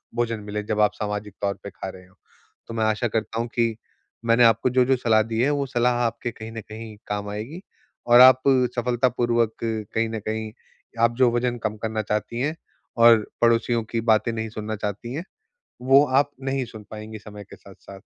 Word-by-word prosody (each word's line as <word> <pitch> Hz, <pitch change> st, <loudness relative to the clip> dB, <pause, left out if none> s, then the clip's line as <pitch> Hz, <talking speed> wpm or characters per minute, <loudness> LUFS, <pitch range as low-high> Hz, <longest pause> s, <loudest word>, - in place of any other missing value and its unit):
भोजन 115 Hz, -2 st, -1 dB
मिले 105 Hz, 0 st, -3 dB
जब 105 Hz, 0 st, -1 dB
आप 105 Hz, -1 st, +3 dB
सामाजिक 105 Hz, -1 st, -4 dB
तौर 100 Hz, -1 st, 0 dB
पे 100 Hz, -, -6 dB
खा 95 Hz, -, -7 dB
रहे 90 Hz, -1 st, -12 dB
हो। 95 Hz, -, -26 dB, 0.5 s
तो 115 Hz, -, -7 dB
मैं 110 Hz, -, 0 dB
आशा 110 Hz, +3 st, +1 dB
करता 110 Hz, +1 st, -2 dB
हूँ 115 Hz, -, -1 dB
कि 115 Hz, -2 st, +1 dB, 0.5 s
मैंने 115 Hz, +1 st, +4 dB
आपको 115 Hz, +2 st, +3 dB
जो-जो 130 Hz, +1 st, +3 dB
सलाह 110 Hz, -3 st, +3 dB
दी 115 Hz, 0 st, -4 dB
है 135 Hz, -, +3 dB
वो 140 Hz, -1 st, 0 dB
सलाह 125 Hz, -1 st, +1 dB
आपके 120 Hz, +1 st, -3 dB
कहीं 110 Hz, 0 st, -9 dB
न 110 Hz, -, -6 dB
कहीं 110 Hz, 0 st, -8 dB
काम 105 Hz, 0 st, -3 dB
आएगी 115 Hz, -, -6 dB, 0.5 s
और 120 Hz, 0 st, +7 dB
आप 130 Hz, 0 st, +8 dB, 0.3 s
सफलतापूर्वक 120 Hz, -2 st, +1 dB
कहीं 110 Hz, 0 st, -2 dB
न 110 Hz, -, -4 dB
कहीं 110 Hz, 0 st, -3 dB, 0.5 s
आप 115 Hz, 0 st, +3 dB
जो 130 Hz, -2 st, +4 dB
वज़न 120 Hz, 0 st, 0 dB
कम 110 Hz, -1 st, -2 dB
करना 110 Hz, -1 st, -1 dB
चाहती 105 Hz, +2 st, -2 dB
हैं 150 Hz, +4 st, -1 dB, 0.5 s
और 115 Hz, -2 st, +7 dB, 0.2 s
पड़ोसियों 115 Hz, 0 st, +2 dB
की 115 Hz, -, -1 dB
बातें 110 Hz, 0 st, +2 dB
नहीं 110 Hz, 0 st, -3 dB
सुनना 110 Hz, 0 st, -5 dB
चाहती 105 Hz, +4 st, -5 dB
हैं, 160 Hz, +5 st, -4 dB, 0.6 s
वो 135 Hz, +3 st, +6 dB
आप 140 Hz, +2 st, +2 dB
नहीं 135 Hz, -1 st, -1 dB
सुन 110 Hz, -3 st, -12 dB
पाएँगी 110 Hz, 0 st, -8 dB
समय 105 Hz, -1 st, -11 dB
के -, -, -9 dB
साथ-साथ। 100 Hz, 0 st, -14 dB
115 Hz, 195 wpm, -24 LUFS, 110-120 Hz, 0.6 s, आप